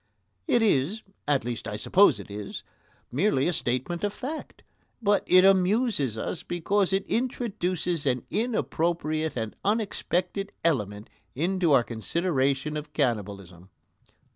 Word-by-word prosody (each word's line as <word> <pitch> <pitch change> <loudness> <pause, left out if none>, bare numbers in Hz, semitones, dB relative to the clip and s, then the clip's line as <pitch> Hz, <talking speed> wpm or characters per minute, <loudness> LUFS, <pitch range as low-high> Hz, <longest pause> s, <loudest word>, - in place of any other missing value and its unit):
It 235 - +3
is 195 +2 +1 0.2
at 140 -5 +2
least, 120 -2 -4
I 105 - -4
suppose 190 - +4
it - - -10
is 100 0 -6 0.5
merely 140 - +2
a 175 - +1
statement 130 +8 -1
of 205 - +1
fact, 285 +9 -7 0.4
but 205 -3 +2
it 185 +1 +7
amuses 195 - +3
us 160 - -3
because 190 +3 0
it 195 0 +1
introduces 185 - -1
an 125 -2 +1
inappropriate 165 - -1
and 110 -2 -3
unexpected 200 -2 -1
element 105 -10 0 0.3
into 175 +3 +1
our 125 - +5
consideration 140 +3 -1
of 150 0 -7
cannibalism. 100 - -2
165 Hz, 125 wpm, -27 LUFS, 125-195 Hz, 0.5 s, it